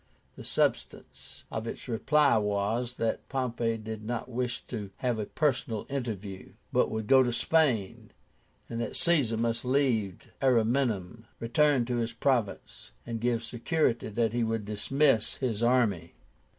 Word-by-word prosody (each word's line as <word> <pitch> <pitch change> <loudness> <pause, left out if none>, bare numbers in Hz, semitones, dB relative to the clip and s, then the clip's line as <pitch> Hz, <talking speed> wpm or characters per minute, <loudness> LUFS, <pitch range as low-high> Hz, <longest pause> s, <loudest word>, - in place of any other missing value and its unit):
The - - -10
substance - - -2
of 110 +1 -4
its - - -6
reply 140 +5 +3
was, 105 +4 -1
that 115 -2 -2
Pompey 120 -3 -1
did 110 0 -7
not 120 +1 -3
wish 125 0 -3
a 110 +1 -3
personal 120 -7 0
interview, 105 -8 -5 0.2
but - - +3
would 110 -1 -3
go 135 +3 +6
to 125 -1 +1
Spain, 120 -7 +1 0.6
and 115 0 -4
that - - -4
Caesar 140 -10 +2
must 115 0 -1
leave 125 -8 0
Ariminum, 115 -4 +1
return 130 +2 +2
to 120 0 -1
his 115 0 -2
province, 115 - -2
and 115 -1 -4
give 120 -1 0
security 120 0 0
that 115 +1 0
he 120 0 +1
would 110 -2 -1
dismiss 115 +3 +1
his 120 -5 -2
army. 110 -9 +1
115 Hz, 135 wpm, -29 LUFS, 110-125 Hz, 0.6 s, go